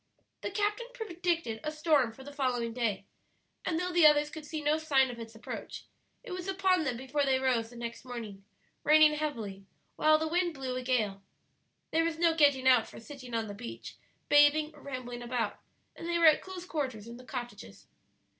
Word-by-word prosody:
The - - -3
captain 420 +4 -1
predicted 345 - -2
a 305 - -2
storm 305 -6 +2
for 265 +4 -13
the 285 +1 -10
following 245 -4 -1
day, 220 -5 -1 0.6
and 320 -2 -1
though 360 0 -2
the 345 -3 +7
others 295 0 +4
could 310 -2 -8
see 310 0 -4
no 300 +1 +1
sign 270 -5 +3
of 235 - -9
its 225 -1 -9
approach, 220 - -7 0.4
it 485 - -9
was 365 0 -5
upon 375 -3 +2
them 250 -4 -1
before 265 +3 -1
they 265 -1 +3
rose 250 -4 +1
the 240 - -14
next 235 -1 -6
morning, 225 -6 -7 0.4
raining 305 0 +6
heavily, 225 -11 -4 0.3
while 310 0 +5
the 315 +1 -2
wind 345 0 0
blew 260 -2 -4
a 255 - -2
gale. 220 -6 0 0.7
There 325 +1 +3
was 330 -1 -1
no 335 0 +3
getting 285 -5 +4
out 250 -3 +5
for - - -11
sitting 255 -1 -9
on 225 -1 0
the 205 - -7
beach, 235 +4 -8 0.3
bathing, 295 +1 +5
or 295 - -16
rambling 250 -3 -6
about, 240 -3 -2 0.4
and 335 - -7
they 340 - +1
were 335 - +4
at 310 -1 +7
close 370 -2 -8
quarters 265 - -3
in 235 0 -9
the 250 - -12
cottages. 245 -1 -8
280 Hz, 200 wpm, -30 LUFS, 240-320 Hz, 0.7 s, the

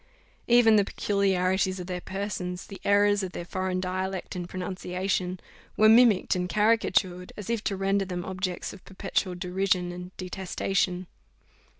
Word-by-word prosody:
Even 235 -2 +6
the 205 - +5
peculiarities 190 -2 +1
of 180 - -5
their 180 0 -4
persons, 185 -2 -4
the 195 - -10
errors 205 0 +4
of 185 -2 -5
their 175 - -5
foreign 185 0 -2
dialect 185 +1 -3
and 175 -1 -5
pronunciation, 185 0 -2 0.4
were 215 - +6
mimicked 225 -4 +5
and 180 0 -2
caricatured, 190 -4 +1
as 210 +2 -4
if 230 -2 -1
to 195 - -1
render 195 +1 +1
them 180 -1 -4
objects 185 -1 -3
of 195 - -13
perpetual 190 -1 -2
derision 180 0 0
and 180 0 -7
detestation. 185 0 -1
190 Hz, 145 wpm, -27 LUFS, 180-200 Hz, 0.4 s, Even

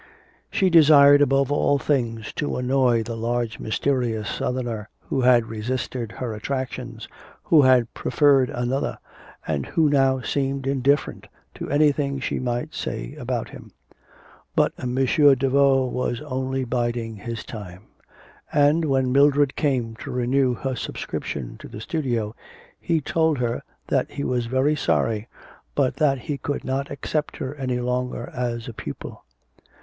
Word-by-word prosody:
She 190 -3 +2
desired 145 -3 +7
above 135 -1 +3
all 145 0 +2
things 120 -6 -1
to 145 - -2
annoy 125 -2 +2
the 115 +1 -5
large 115 0 -2
mysterious 115 -2 -1
Southerner 120 -4 -3
who 135 - -2
had 125 -2 +5
resisted 115 +1 -4
her 120 -3 -4
attractions, 125 0 -5 0.4
who 155 - +5
had 130 -3 +4
preferred 140 -4 +3
another, 125 +3 -2 0.5
and 70 -3 -2
who 160 -3 +2
now 135 -2 +3
seemed 135 0 -2
indifferent 140 +1 0 0.3
to - - -7
anything 145 -1 +2
she - - -2
might 120 -1 -3
say - - -4
about - - -3
him. - - -12 0.8
But - - +3
M. 125 0 -3
Daveau 135 0 +4
was 125 -1 -2
only 130 -2 -2
biding 120 -2 -2
his 115 +2 -6
time; 95 -4 -9 0.7
and 150 +3 +3
when 135 -3 +1
Mildred 140 0 +4
came 125 -6 0
to - - -8
renew 125 0 +1
her 130 +1 -3
subscription 70 - -5
to - - -10
the 105 - -9
studio, 120 -5 -2 0.4
he 165 -2 0
told 160 +1 +1
her 120 -1 -1 0.3
that - - +1
he 140 - -5
was 120 -3 -1
very 130 +5 +2
sorry, 110 -6 0 0.5
but 135 -3 +1
that 140 -4 +2
he 145 +1 -4
could 145 - -3
not 135 +1 -2
accept 150 +2 -3
her 130 +1 -4
any 130 -4 -2
longer 125 0 -2
as 120 -1 -3
a 120 - -6
pupil. 70 -9 -8
130 Hz, 145 wpm, -23 LUFS, 120-140 Hz, 0.8 s, desired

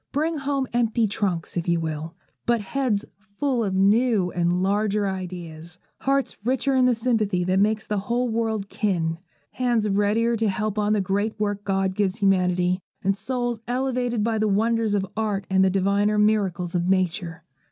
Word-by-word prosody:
Bring 315 +2 0
home 275 -1 -1
empty 235 -1 +2
trunks, 195 -5 -2
if 175 -1 -2
you 170 -1 +2
will, 160 +1 -4 0.3
but 235 -1 +3
heads 220 0 -1 0.3
full 265 -5 +1
of 195 -3 -1
new 205 -1 +3
and 175 +1 +1
larger 205 +1 +1
ideas, 175 -3 -6 0.2
hearts 275 0 0
richer 265 +3 +1
in 255 -1 +4
the 250 -1 +3
sympathy 220 -6 0
that 185 +2 +1
makes 215 +2 +1
the 210 -1 -1
whole 240 +5 -1
world 220 -3 -1
kin, 170 -6 -1 0.3
hands 240 -4 0
readier 210 +4 +2
to 220 -1 +1
help 210 +2 -2
on 210 0 +2
the 210 - +2
great 205 +3 -1
work 205 -1 -1
God 195 -1 0
gives 195 -1 0
humanity, 185 -3 +2 0.2
and 195 0 +2
souls 245 +1 -2
elevated 245 -2 -1
by 225 0 0
the 215 - +2
wonders 220 +1 +1
of 195 -1 0
art 210 -3 -1
and 190 0 +4
the 190 - +4
diviner 200 +2 +1
miracles 195 -5 +1
of 175 0 0
Nature. 175 -3 -1
205 Hz, 175 wpm, -24 LUFS, 185-230 Hz, 0.3 s, in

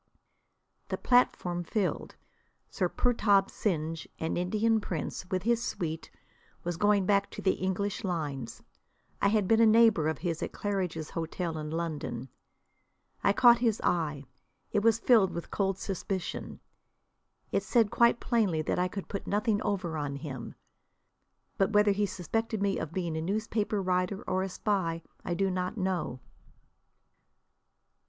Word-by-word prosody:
The - - -2
platform 180 -8 +2
filled. 200 +2 -2 0.6
Sir - - 0
Purtab 205 -5 +2
Singh, 165 -5 -1 0.2
an 160 - -1
Indian 215 +5 +1
prince, 180 0 -4
with 185 -2 -1
his 235 +1 +2
suite, 160 -7 -4 0.5
was 175 0 -2
going 205 +1 +3
back 200 0 +2
to - - -9
the 190 - +4
English 195 +3 -1
lines. 145 - -4 0.6
I - - +4
had 205 -2 +2
been 225 +2 +4
a - - +7
neighbour 220 -8 +5
of 160 -2 -1
his 165 0 -3
at - - -4
Claridge's 180 -6 -2
Hotel 165 0 -3
in 150 0 -5
London. 155 -6 -4 0.9
I - - +5
caught 235 +3 +6
his 230 -3 +1
eye. 155 -5 0 0.5
It 210 - +2
was 225 +1 +4
filled 225 -4 +5
with 170 - -6
cold 195 -2 0
suspicion. 190 -1 -4 0.9
It - - +2
said 230 -4 +2
quite 235 0 +4
plainly 200 -10 +1
that - - -1
I 180 - +2
could 195 +1 -6
put 200 - -5
nothing 210 +1 +1
over 185 -6 -2
on 145 -1 -3
him. 140 -4 -7 1.0
But 195 +2 +2
whether 210 0 +5
he 205 +1 +1
suspected 220 +5 -2
me 200 -1 0
of 160 - -4
being 170 -3 -2
a 160 - -2
newspaper 210 +3 -1
writer 185 +1 0
or 185 - 0
a 190 - -2
spy 180 -4 -1 0.2
I 175 - -2
do 195 +1 +1
not 180 +3 -2
know. 185 - -2
190 Hz, 150 wpm, -30 LUFS, 165-210 Hz, 1.0 s, a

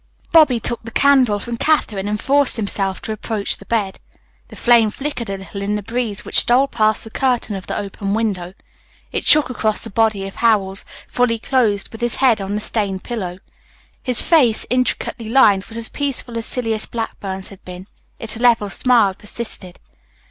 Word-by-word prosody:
Bobby 300 -7 +5
took 235 +2 -3
the 230 - -9
candle 255 -4 +4
from 235 +3 -5
Katherine 220 -10 +1
and 210 0 -2
forced 280 +1 +2
himself 195 -3 -2
to - - -4
approach 215 -1 -2
the 200 - -16
bed. 210 -5 -1 0.5
The - - -13
flame 235 -2 +4
flickered 255 -1 -5
a 195 - -3
little 195 +1 -8
in 205 +1 -1
the 210 - -4
breeze 225 -1 -3
which - - +3
stole 255 +3 +4
past 215 -4 +1
the 225 - -8
curtain 245 -5 0
of 190 -1 -8
the - - -3
open 200 0 -3
window. 195 -5 -2 0.6
It - - -3
shook 300 -4 +5
across 220 -3 -1
the 225 - -7
body 215 -2 +1
of 195 - -11
Howells, 200 -4 +1 0.2
fully 245 -2 +1
clothed 225 -5 0
with 225 - -10
his 240 -1 0
head 245 -6 +3
on 195 +1 -3
the - - -1
stained 200 -3 -2
pillow. 190 -7 -5 0.6
His 250 -2 +2
face, 260 -10 +3
intricately 250 -2 -1
lined, 210 -6 +4
was 225 0 -8
as 230 -1 0
peaceful 275 -4 -4
as 230 -1 -2
Silas 225 -3 -1
Blackburn's 195 -4 -5
had 195 - -14
been. 180 0 -9 0.3
Its 225 -1 -5
level 230 -4 +3
smile 235 -6 +3
persisted. 205 -3 -6
220 Hz, 185 wpm, -19 LUFS, 200-240 Hz, 0.6 s, Bobby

